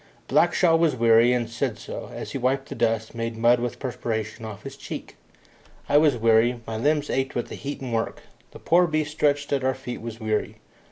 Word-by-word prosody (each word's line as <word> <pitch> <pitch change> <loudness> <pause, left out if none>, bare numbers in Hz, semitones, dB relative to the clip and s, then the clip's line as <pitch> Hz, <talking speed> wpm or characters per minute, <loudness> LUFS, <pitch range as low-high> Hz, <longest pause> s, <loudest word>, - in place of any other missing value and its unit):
Blackshaw 170 -3 +4
was 165 -5 +3
weary, 115 0 +5
and 120 -2 0
said 120 0 -2
so, - - -7
as - - -7
he 135 - -3
wiped 135 +2 0
the - - -4
dust, 110 0 0
made 115 -1 -4
mud 120 +2 +4
with 120 0 -3
perspiration, 115 -4 -4
off 110 -3 -8
his - - -8
cheeks. - - -8 0.7
I 145 - +5
was 150 -5 +3
weary 115 +2 +3
my 110 - -5
limbs 150 +5 +1
ached 135 0 -1
with 120 - -2
the - - -6
heat 140 0 -6
and 125 -3 -4
work. 115 0 -2 0.3
The - - -12
poor 175 +1 +3
beast 155 -1 -1
stretched 145 -2 +1
at 135 -2 0
our 130 0 +1
feet 125 -2 -7
was 115 0 -7
weary. 110 -1 -1
120 Hz, 210 wpm, -25 LUFS, 115-145 Hz, 0.7 s, weary